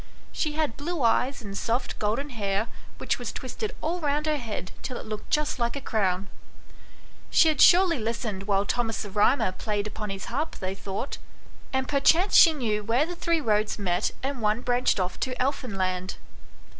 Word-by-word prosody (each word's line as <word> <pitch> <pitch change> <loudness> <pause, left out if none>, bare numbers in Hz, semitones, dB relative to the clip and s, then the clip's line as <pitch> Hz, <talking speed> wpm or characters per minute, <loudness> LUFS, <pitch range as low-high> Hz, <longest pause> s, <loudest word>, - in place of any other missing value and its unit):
She 305 -2 -1
had 305 -6 -1
blue 315 0 -3
eyes 250 +3 +2
and 200 -1 -7
soft 235 +5 -2
golden 235 +8 -1
hair, 205 -1 -1 0.3
which - - -1
was - - -4
twisted 435 -2 -5
all 340 +3 -1
round 295 -1 0
her 305 -1 +1
head, 220 -7 -5
till 255 - -5
it - - -8
looked 215 -1 -6
just 300 -2 0
like 235 +1 0
a - - -2
crown. 195 -6 0 1.0
She 320 - +5
had 305 - +1
surely 355 -4 +6
listened 215 -3 -3
while 200 -1 +2
Thomas 225 0 -1
the 205 - -7
Ehymer 205 0 +2
played 210 -2 -1
upon 210 0 -5
his 195 0 -5
harp, 290 +7 -3
they 190 0 -4
thought; 195 +6 -5 0.5
and 265 -1 0
perchance 325 +7 +3
she 330 - +9
knew 220 -8 -1
where 235 +7 +2
the 350 +2 -6
three 335 -1 0
roads 215 -4 +1
met 180 -4 0
and 270 -2 -3
one 215 +2 +1
branched 245 -3 +1
off 185 0 -2
to 255 -1 -3
Elfinland. 195 -9 -1
235 Hz, 180 wpm, -26 LUFS, 205-290 Hz, 1.0 s, she